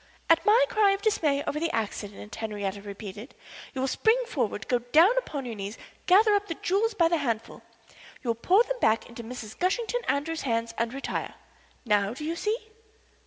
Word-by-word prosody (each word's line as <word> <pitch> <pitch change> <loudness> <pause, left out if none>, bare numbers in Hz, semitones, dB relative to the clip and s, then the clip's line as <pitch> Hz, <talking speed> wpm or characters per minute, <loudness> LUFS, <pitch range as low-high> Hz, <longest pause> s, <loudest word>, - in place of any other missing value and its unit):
At 330 0 +5
my 465 +4 +6
cry 425 -5 +3
of 395 - -5
dismay 305 -10 +1
over 300 - -2
the 335 +1 0
accident," 210 -2 -4
Henriette 205 -2 -4
repeated, 205 +3 -8 0.4
"you 260 - -2
will 265 - +1
spring 445 - +3
forward, 240 - -2
go 245 - +2
down 315 - +5
upon 285 - -6
your 240 - -4
knees, 200 0 -6
and - - -15 0.2
gather 420 +4 +6
up 410 0 +1
the 330 - -4
jewels 420 +7 0
by 335 -5 +4
the 335 0 +2
handful. 230 -7 -3 0.6
You 240 - +1
will 230 0 -6
pour 385 - +5
them - - -4
back 220 - +2
into 235 0 -9
Mrs. 225 -2 -8
Gushington 460 +6 0
Andrews's 320 +3 -1
hands 230 -2 -1
and 230 0 0
retire. 275 +2 -4 0.5
Now, 210 0 +2
do 300 - -6
you 330 +2 -2
see?" 435 +4 -3
280 Hz, 195 wpm, -27 LUFS, -, 0.6 s, my